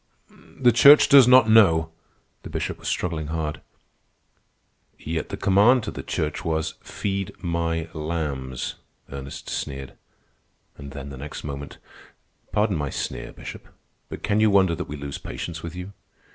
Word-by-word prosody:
"The 125 -2 +5
Church 145 +5 +8
does 135 -3 +8
not 125 -2 +7
know." 85 -8 +5 0.5
The - - -9
Bishop - - -4
was - - -8
struggling 80 -4 -2
hard. 80 -1 -3 1.4
"Yet 80 +1 -4
the - - -5
command 105 +6 +4
to - - -4
the - - -6
Church 75 -1 -3
was, 80 -1 -1
'Feed 100 -2 -4
my 85 -1 -1
lambs,'" 75 -5 -4 0.3
Ernest 70 0 -7
sneered. 70 -2 -5 0.8
And 70 -1 -10
then, 70 0 -8
the 70 - -9
next 75 +2 -7
moment, 70 -1 -7 0.7
"Pardon 105 -4 +1
my 70 -2 -2
sneer, - - -5
Bishop. - - -10 0.4
But - - -8
can 105 - +1
you 110 0 +5
wonder 95 -3 +4
that - - -5
we 75 - -5
lose 70 0 -6
patience 80 -1 -6
with 85 +1 -7
you? 90 +2 -7
80 Hz, 150 wpm, -24 LUFS, 75-100 Hz, 1.4 s, Church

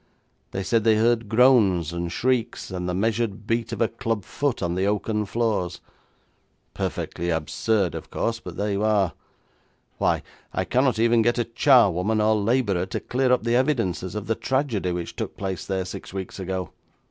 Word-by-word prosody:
They 95 - -3
said 115 +2 +1
they 110 -1 +5
heard 115 0 +2
groans 110 - +4
and 85 0 -3
shrieks, 125 +1 -1
and 90 -1 -3
the 90 - -1
measured 110 0 -1
beat 115 +1 -1
of 115 - -4
a 115 - +4
club 115 -4 -3
foot 140 -8 -2
on 85 -1 0
the 95 +2 0
oaken 105 +1 -1
floors. 100 -6 -1 0.9
Perfectly 85 +1 -3
absurd, 85 +3 0
of 80 - -7
course, 115 0 -1
but 90 -6 -9
there 105 0 -1
you 100 +1 -1
are! 105 -4 +2 0.9
Why, - - +1 0.3
I - - -1
cannot 130 -1 +2
even 115 +1 +4
get 120 +2 +2
a 120 - +2
charwoman 110 - +4
or 110 +1 +3
labourer 100 -4 +1
to - - -3
clear 130 0 0
up 125 - +3
the 115 +1 +1
evidences 115 - 0
of 105 -1 -4
the 115 - +1
tragedy 120 -7 -1
which 85 -1 -4
took - - -5
place 95 -2 -4
there 95 -1 -1
six 90 - -8
weeks 95 0 -6
ago. 95 -1 -3
105 Hz, 180 wpm, -24 LUFS, 95-115 Hz, 0.9 s, they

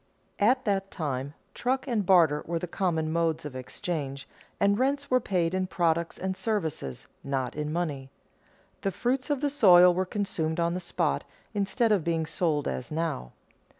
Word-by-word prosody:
At 255 +5 +3
that 195 -2 0
time, 140 -4 -3 0.2
truck 260 +2 -1
and 230 -5 +1
barter 170 -6 +4
were 170 0 -1
the 165 - -3
common 160 -3 -1
modes 165 -2 0
of 145 -3 -6
exchange, 140 +1 -4 0.3
and 200 +1 +3
rents 280 +2 0
were 255 - +5
paid 180 -6 0
in 185 0 0
products 170 -2 0
and 190 0 -2
services, 160 - -3 0.2
not 135 -2 -2
in 150 0 -3
money. 150 -6 -2 0.7
The 195 - 0
fruits 245 - -1
of 285 -2 0
the 290 - +1
soil 180 -9 +7
were 185 +1 -1
consumed 170 -6 -2
on 170 0 +1
the 180 - -2
spot 175 - -1 0.3
instead 210 +3 +1
of 200 -6 +3
being 165 -1 0
sold 155 -3 0
as 125 - -4
now. 155 - -2
175 Hz, 170 wpm, -28 LUFS, 155-200 Hz, 0.7 s, soil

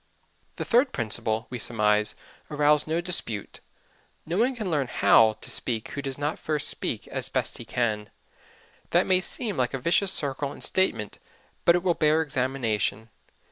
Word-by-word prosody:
The - - -5
third 250 +3 +2
principle 110 -1 -1
will, 120 - -25
we 125 - -4
surmise, 105 -2 +1 0.3
arouse 150 0 +3
no 165 +2 0
dispute: 145 - -2 0.7
No 170 +5 -2
one 255 +3 +2
can 215 -6 -4
learn 145 -4 0
how 110 -2 +4
to 110 - -5
speak 115 -3 -2
who 140 - -5
does 135 -1 -5
not 145 +1 -3
first 155 -2 0
speak - - -4
as - - -4
best - - -2
he - - -8
can. 110 -3 -2 0.8
That - - +3
may 185 -1 +4
seem 210 +1 -1
like 125 +1 0
a - - -4
vicious 175 +7 +3
circle 140 -3 +1
in - - -13
statement, 190 - 0 0.5
but 170 - +6
it 175 - -1
will 180 -2 +2
bear 155 0 +2
examination. 125 -6 -2
140 Hz, 175 wpm, -26 LUFS, 115-170 Hz, 0.8 s, but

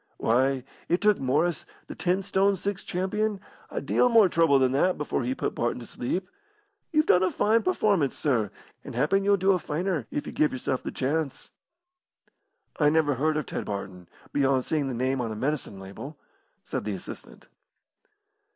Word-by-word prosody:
"Why, 130 +3 +2 0.3
it 175 - +3
took 210 -1 +3
Morris, 150 +5 +1 0.2
the - - -8
ten 185 +2 0
stone 195 +1 +2
six 195 +1 -4
champion, 200 +3 -1 0.3
a - - -3
deal 250 - +3
more 225 -5 +6
trouble 165 -4 +4
than 130 -1 +3
that 180 +7 +2
before 150 -1 -1
he 125 +2 -1
put - - -2
Barton 120 +1 -1
to 120 - -9
sleep. 180 +13 -3 0.6
You've 310 -2 +3
done 180 - +5
a 185 - +3
fine 225 +2 +2
performance, 205 - +1
sir, 120 -8 +1 0.3
and - - -8
happen 160 +10 +2
you'll 200 0 +4
do 190 +1 +3
a 185 - +2
finer, 160 - -2
if 145 - -3
you - - -7
give 150 -2 +2
yourself 130 0 -2
the - - -4
chance." 140 +1 -2 1.3
"I 150 -1 +5
never 155 -1 +3
heard 155 +4 +1
of 150 - -2
Ted - - -4
Barton, 95 -3 -6 0.2
beyond 135 -2 +2
seeing 150 -3 0
the 130 - -3
name 130 +2 0
on 115 -2 -3
a - - -4
medicine 130 -4 -2
label," 100 +10 -9 0.5
said - - -4
the - - -3
assistant. - - -10
150 Hz, 180 wpm, -27 LUFS, 130-185 Hz, 1.3 s, more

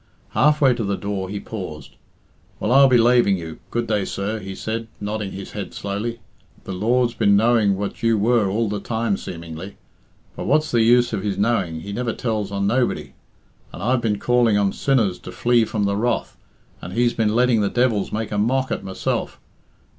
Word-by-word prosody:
Half 150 +2 +3
way 135 -3 +5
to 120 -2 -3
the 100 -1 -1
door 100 -2 -4
he 100 +1 -4
paused. 75 - -8 0.6
"Well, 105 - -1
I'll 135 +1 +7
be 125 -2 +5
laving 120 -4 +4
you; 80 -2 -8
good 120 0 -1
day, 105 -3 0
sir," 100 +4 -3
he 95 -1 -7
said, 115 +2 -4
nodding 105 -1 -3
his 100 0 -8
head - - -6
slowly. 105 +4 -4 0.4
"The - - -7
Lord's 120 +5 +1
been 100 -3 +3
knowing 110 -2 +3
what 100 0 -4
you 115 -1 +3
were 110 -1 +2
all 110 +3 0
the 105 0 -2
time 110 0 -1
seemingly. 85 +1 -8 0.6
But - - -5
what's 155 +1 +2
the 120 - +3
use 120 +1 +4
of 105 - -1
His 100 -1 -2
knowing 100 -7 0
He 100 +4 -7
never 120 0 -2
tells 110 -4 -2
on 100 0 -1
nobody. 120 +4 0 0.6
And 90 - -8
I've 125 +2 +2
been 105 -3 0
calling 120 -2 +3
on 100 -1 +1
sinners 115 -10 +1
to - - -9
flee 120 -1 +2
from 105 -1 -2
the 100 0 +1
wrath, 120 +4 -1 0.5
and 90 - -7
He's 120 +1 +2
been 110 -1 0
letting 120 -2 +3
the 100 - +1
devils 120 -5 +1
make 110 +1 -3
a 105 - -1
mock 130 +5 +1
at - - -2
myself! 95 -1 -3
110 Hz, 200 wpm, -22 LUFS, 100-120 Hz, 0.6 s, I'll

